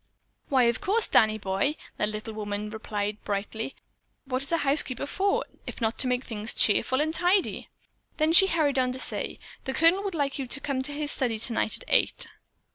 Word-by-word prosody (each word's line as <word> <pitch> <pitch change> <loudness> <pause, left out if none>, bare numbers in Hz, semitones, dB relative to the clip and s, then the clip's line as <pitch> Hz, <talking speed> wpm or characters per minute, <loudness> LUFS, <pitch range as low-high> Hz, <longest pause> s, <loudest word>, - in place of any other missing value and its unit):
"Why 265 -3 +4
of 235 +7 +1
course 420 +3 +2
Danny 215 -1 +4
boy," 200 +8 -1 0.2
that 210 - 0
little 215 +1 -6
woman 210 0 -4
replied 210 -1 -4
brightly. 210 +5 -4 0.5
"What 255 -1 -2
is 275 - -1
a 335 - +3
housekeeper 275 -4 +2
for, 390 +7 0 0.2
if - - -7
not 225 -1 -1
to 260 - +6
make 250 0 0
things 220 -1 -2
cheerful 260 +5 +3
and 315 +1 -1
tidy?" 355 +3 +1 0.5
Then 310 +1 +2
she 385 +3 +9
hurried 300 -7 +1
on 255 -1 +1
to 260 - -5
say, - - -4 0.3
"The 265 - -3
Colonel 330 +6 +5
would 390 -4 -3
like 280 -2 -1
you 265 - -3
to 270 - -2
come 275 -2 -2
to 280 +3 -4
his 290 0 -1
study 240 -4 +1
tonight 225 0 0
at - - -7
eight." - - +2
260 Hz, 200 wpm, -27 LUFS, 220-305 Hz, 0.5 s, she